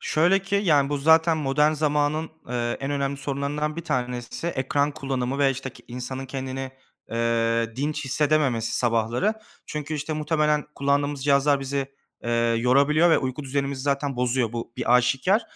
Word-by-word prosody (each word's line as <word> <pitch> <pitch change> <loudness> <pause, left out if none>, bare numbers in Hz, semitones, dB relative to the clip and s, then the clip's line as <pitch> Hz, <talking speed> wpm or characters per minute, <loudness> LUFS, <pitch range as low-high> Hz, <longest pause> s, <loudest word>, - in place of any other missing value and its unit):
Şöyle 175 +5 +3
ki 195 +1 -3
yani 145 -5 +4
bu 145 0 -1
zaten 160 +3 +4
modern 150 +1 +2
zamanın, 150 +1 0 0.2
ııı, 120 -1 -1
en 135 +1 -3
önemli 140 -1 -1
sorunlarından 140 +2 -2
bir 170 - -5
tanesi 125 0 -3
ekran 140 -1 0
kullanımı 135 -2 -3
ve 140 -1 +4
işte 135 0 -5
ke - - -17
insanın 125 +2 -5
kendini, 130 0 -5 0.4
eee, 115 0 0
dinç 145 +2 -2
hissedememesi 140 -4 +1
sabahları 120 - +1 0.3
çünkü 150 0 -4
işte 150 +1 -3
muhtemelen 150 -1 +1
kullandığımız 140 0 0
cihazlar 140 0 +3
bizi, 135 0 -3 0.3
eee, 120 - -2 0.3
yorabiliyor 140 +7 +4
ve - - +5
uyku 130 +2 -3
düzenimizi 140 0 -2
zaten 140 -1 -1
bozuyor. 125 -2 +1
Bu 115 0 -5
bir 120 - +2
aşikâr. 135 - +3
140 Hz, 155 wpm, -24 LUFS, 130-150 Hz, 0.4 s, ve